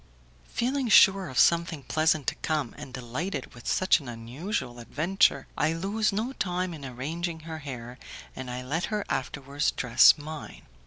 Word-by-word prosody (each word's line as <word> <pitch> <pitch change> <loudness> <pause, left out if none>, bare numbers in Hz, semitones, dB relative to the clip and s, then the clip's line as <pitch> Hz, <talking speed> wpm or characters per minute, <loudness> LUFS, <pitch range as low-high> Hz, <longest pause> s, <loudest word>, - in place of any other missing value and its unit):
Feeling 255 +1 0
sure 195 -3 +6
of 130 - -7
something 170 -3 +3
pleasant 155 +1 +1
to - - 0
come, 150 -6 -1
and 145 -2 -9
delighted 130 +5 -4
with 120 - -11
such 185 -2 +3
an 140 - -11
unusual 120 - -4
adventure, 150 - +1
I 160 - +1
lose 200 +6 0
no 220 +6 -2
time 180 -4 -2
in 150 -3 -9
arranging 160 +6 -4
her 160 0 -7
hair, 125 -4 -8 0.4
and 130 -1 -6
I 125 +1 -5
let 160 +6 -1
her 210 -2 -2
afterwards 140 +2 -1
dress 125 +5 +5
mine. 150 - -8
155 Hz, 160 wpm, -27 LUFS, 130-180 Hz, 0.4 s, sure